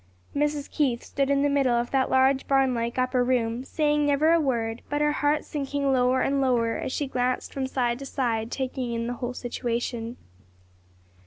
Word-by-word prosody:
Mrs. 295 Hz, 0 st, 0 dB
Keith 260 Hz, -6 st, 0 dB
stood 275 Hz, 0 st, -1 dB
in 280 Hz, 0 st, +2 dB
the -, -, +3 dB
middle 275 Hz, -4 st, +2 dB
of 240 Hz, 0 st, -1 dB
that 265 Hz, -1 st, +2 dB
large, 265 Hz, +1 st, +3 dB
barn 270 Hz, -2 st, +3 dB
like 235 Hz, 0 st, -2 dB
upper 255 Hz, 0 st, +2 dB
room, 245 Hz, -1 st, 0 dB
saying 295 Hz, +1 st, +1 dB
never 290 Hz, +3 st, +3 dB
a 335 Hz, -, +4 dB
word, 235 Hz, -6 st, -1 dB
but 290 Hz, -, -1 dB
her 295 Hz, 0 st, +2 dB
heart 295 Hz, 0 st, +1 dB
sinking 280 Hz, -1 st, -1 dB
lower 255 Hz, 0 st, +3 dB
and 275 Hz, 0 st, +1 dB
lower 240 Hz, -3 st, +1 dB
as -, -, -4 dB
she 290 Hz, -, -1 dB
glanced 255 Hz, -1 st, -2 dB
from 265 Hz, -1 st, -2 dB
side 245 Hz, -2 st, -1 dB
to 275 Hz, -, -7 dB
side 230 Hz, -4 st, -1 dB
taking 255 Hz, -2 st, -3 dB
in 230 Hz, 0 st, -2 dB
the 240 Hz, -, -2 dB
whole 250 Hz, 0 st, -3 dB
situation. 240 Hz, -1 st, -3 dB
260 Hz, 190 wpm, -26 LUFS, 240-280 Hz, -, a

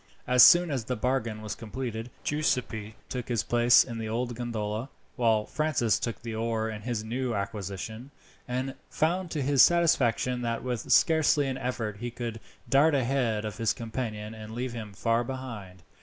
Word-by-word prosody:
As 125 Hz, 0 st, +5 dB
soon 175 Hz, -2 st, +8 dB
as 130 Hz, -5 st, -2 dB
the 125 Hz, -, -2 dB
bargain 115 Hz, -2 st, -1 dB
was 105 Hz, -, -4 dB
completed, 115 Hz, 0 st, -5 dB
Giuseppi 125 Hz, -7 st, -1 dB
took 125 Hz, -2 st, -5 dB
his 115 Hz, -4 st, 0 dB
place 120 Hz, 0 st, +5 dB
in 115 Hz, -3 st, -6 dB
the 110 Hz, -1 st, -4 dB
old 120 Hz, +2 st, -2 dB
gondola, 115 Hz, 0 st, -3 dB, 0.3 s
while 115 Hz, -4 st, +2 dB
Francis 150 Hz, -8 st, +1 dB
took 115 Hz, 0 st, -4 dB
the 115 Hz, -1 st, -5 dB
oar 110 Hz, 0 st, -1 dB
in 105 Hz, -1 st, -7 dB
his 115 Hz, -1 st, -3 dB
new 120 Hz, +1 st, -2 dB
acquisition, 100 Hz, +4 st, -5 dB, 0.4 s
and 130 Hz, +2 st, -2 dB, 0.2 s
found 175 Hz, +3 st, 0 dB
to 150 Hz, -4 st, -2 dB
his 135 Hz, -1 st, +4 dB
satisfaction 125 Hz, -7 st, +3 dB
that 115 Hz, -1 st, -2 dB
with 125 Hz, -3 st, -3 dB
scarcely 160 Hz, -3 st, +4 dB
an 135 Hz, -1 st, -3 dB
effort 115 Hz, -5 st, -3 dB
he 120 Hz, +3 st, -4 dB
could 115 Hz, -1 st, -5 dB, 0.3 s
dart 145 Hz, +3 st, +4 dB
ahead 120 Hz, -5 st, 0 dB
of 105 Hz, +2 st, -6 dB
his 115 Hz, -2 st, +2 dB
companion 110 Hz, -2 st, -5 dB
and 110 Hz, 0 st, -9 dB
leave 125 Hz, 0 st, -3 dB
him 110 Hz, -3 st, -6 dB
far 115 Hz, +4 st, +1 dB
behind. 115 Hz, -9 st, -7 dB
120 Hz, 170 wpm, -28 LUFS, 110-130 Hz, 0.4 s, soon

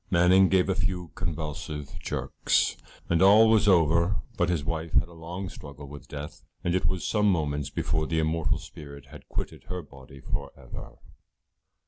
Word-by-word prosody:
Manning 90 Hz, +2 st, +5 dB
gave 95 Hz, -1 st, +3 dB
a 95 Hz, -, +2 dB
few 95 Hz, -3 st, -2 dB
convulsive 75 Hz, -2 st, -5 dB
jerks, -, -, 0 dB, 0.3 s
and 85 Hz, -1 st, +2 dB
all 105 Hz, +4 st, +8 dB
was 110 Hz, -1 st, +4 dB
over, 85 Hz, 0 st, +4 dB, 0.2 s
but 85 Hz, -, +1 dB
his 85 Hz, -5 st, 0 dB
wife 80 Hz, -1 st, -3 dB
had -, -, +3 dB
a 85 Hz, -, -15 dB
long 85 Hz, +4 st, -6 dB
struggle 70 Hz, -3 st, -10 dB
with 70 Hz, +1 st, -11 dB
death, 75 Hz, +1 st, -7 dB, 0.2 s
and 85 Hz, -, +1 dB
it 90 Hz, -, +1 dB
was 90 Hz, -5 st, -1 dB
some 105 Hz, +4 st, +3 dB
moments 75 Hz, -5 st, -1 dB
before 80 Hz, +3 st, -1 dB
the 80 Hz, -, -1 dB
immortal 80 Hz, 0 st, +1 dB
spirit 70 Hz, -2 st, -11 dB
had -, -, -13 dB
quitted -, -, -5 dB
her 90 Hz, -1 st, -5 dB
body 70 Hz, -1 st, -14 dB
for -, -, -4 dB
ever. -, -, -10 dB
85 Hz, 170 wpm, -27 LUFS, 75-90 Hz, 0.3 s, all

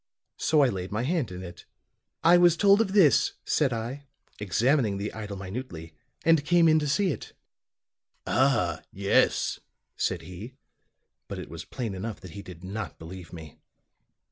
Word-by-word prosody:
So 155 Hz, -2 st, +3 dB
I 135 Hz, -, +4 dB
laid 95 Hz, -3 st, -5 dB
my 110 Hz, +3 st, -1 dB
hand 145 Hz, -, -1 dB
in 90 Hz, +1 st, -7 dB
it. 85 Hz, -1 st, -10 dB, 0.6 s
"'I 175 Hz, +1 st, +7 dB
was 175 Hz, -2 st, +5 dB
told 200 Hz, +2 st, +5 dB
of 195 Hz, -4 st, -1 dB
this,' 185 Hz, -9 st, +5 dB
said 145 Hz, -4 st, +2 dB
I, 120 Hz, +5 st, -4 dB, 0.3 s
examining 110 Hz, -, +1 dB
the 100 Hz, +2 st, -4 dB
idol 105 Hz, -2 st, -6 dB
minutely, 95 Hz, -4 st, -7 dB, 0.3 s
'and 165 Hz, -3 st, +4 dB
came 170 Hz, +2 st, +4 dB
in 155 Hz, 0 st, +5 dB
to 150 Hz, -, -2 dB
see 185 Hz, +6 st, +2 dB
it.' -, -, -7 dB, 0.9 s
"'Ah, 115 Hz, -, +2 dB
yes,' 100 Hz, +1 st, +1 dB, 0.4 s
said 90 Hz, -3 st, -1 dB
he. 95 Hz, +9 st, -9 dB, 0.7 s
But -, -, -6 dB
it -, -, -8 dB
was -, -, -7 dB
plain 115 Hz, -5 st, -4 dB
enough 105 Hz, +3 st, -5 dB
that 90 Hz, -, -10 dB
he 100 Hz, -, -8 dB
did 90 Hz, -3 st, -12 dB
not 100 Hz, +4 st, -5 dB
believe 85 Hz, +1 st, -10 dB
me. 80 Hz, -4 st, -11 dB
110 Hz, 165 wpm, -27 LUFS, 95-150 Hz, 0.9 s, I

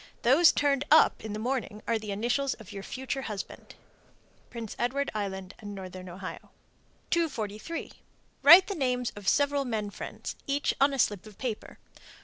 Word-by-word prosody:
Those 285 Hz, +8 st, +6 dB
turned 280 Hz, -1 st, +1 dB
up 315 Hz, -, +5 dB
in 215 Hz, -1 st, -5 dB
the -, -, -3 dB
morning 225 Hz, -2 st, -3 dB
are 230 Hz, -1 st, +1 dB
the 215 Hz, -1 st, -8 dB
initials 240 Hz, +7 st, 0 dB
of 220 Hz, -3 st, -13 dB
your 200 Hz, -1 st, -6 dB
future 265 Hz, +6 st, -4 dB
husband. 210 Hz, -6 st, -7 dB, 0.7 s
Prince 230 Hz, -3 st, -7 dB
Edward 275 Hz, +4 st, 0 dB
Island 190 Hz, -3 st, -4 dB
and 205 Hz, -1 st, -7 dB
Northern 185 Hz, -1 st, -8 dB
Ohio. 185 Hz, +2 st, -8 dB, 0.6 s
243. 275 Hz, -, -2 dB, 0.5 s
Write 340 Hz, +6 st, +10 dB
the 400 Hz, -, -3 dB
names 250 Hz, -6 st, -1 dB
of 205 Hz, -2 st, -9 dB
several 285 Hz, +2 st, +3 dB
men 220 Hz, -5 st, -3 dB
friends, -, -, -7 dB
each 285 Hz, +1 st, +1 dB
on 280 Hz, +1 st, +5 dB
a 275 Hz, -, -3 dB
slip 205 Hz, -4 st, +1 dB
of 210 Hz, -, -14 dB
paper. 240 Hz, -5 st, -5 dB
235 Hz, 160 wpm, -29 LUFS, 205-275 Hz, 0.7 s, Write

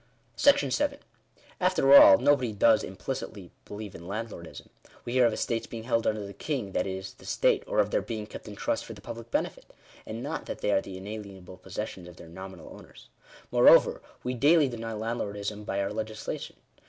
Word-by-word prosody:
§7. 285 Hz, 0 st, +3 dB, 0.6 s
After 180 Hz, -7 st, +4 dB
all, 95 Hz, -8 st, +10 dB
nobody 130 Hz, -4 st, +2 dB
does 100 Hz, -, +4 dB
implicitly -, -, -6 dB
believe 105 Hz, -1 st, -8 dB
in 85 Hz, +1 st, -10 dB
landlordism. 100 Hz, -4 st, -7 dB, 0.4 s
We 120 Hz, -, -4 dB
hear 125 Hz, -2 st, +5 dB
of 115 Hz, -, -1 dB
estates 115 Hz, +1 st, -2 dB
being 115 Hz, -1 st, -7 dB
held 115 Hz, -1 st, 0 dB
under 105 Hz, -1 st, -1 dB
the 100 Hz, -, -8 dB
king, 125 Hz, -9 st, -3 dB
that -, -, -1 dB
is, 95 Hz, 0 st, -5 dB
the -, -, -18 dB
State; -, -, +2 dB
or -, -, -3 dB
of -, -, +3 dB
their -, -, +2 dB
being 110 Hz, -2 st, -5 dB
kept 110 Hz, -, -10 dB
in 105 Hz, -, -8 dB
trust 110 Hz, -, -1 dB
for 115 Hz, -, -9 dB
the 105 Hz, -, -13 dB
public 115 Hz, +1 st, -8 dB
benefit; -, -, -3 dB, 0.4 s
and 115 Hz, +2 st, -5 dB
not 145 Hz, +3 st, -4 dB
that -, -, -6 dB
they 105 Hz, -, +1 dB
are 95 Hz, -, +3 dB
the 95 Hz, -1 st, -8 dB
inalienable 95 Hz, -2 st, -9 dB
possessions 95 Hz, -3 st, -6 dB
of 90 Hz, -, -12 dB
their 80 Hz, -, -12 dB
nominal 95 Hz, 0 st, -10 dB
owners. -, -, -15 dB, 0.4 s
Moreover, -, -, +6 dB, 0.2 s
we 125 Hz, -, -2 dB
daily 145 Hz, +4 st, +4 dB
deny 115 Hz, -2 st, -5 dB
landlordism 105 Hz, -2 st, -4 dB
by 100 Hz, -, -2 dB
our 100 Hz, -, -3 dB
legislation. 110 Hz, 0 st, -5 dB
110 Hz, 190 wpm, -28 LUFS, 100-120 Hz, 0.6 s, all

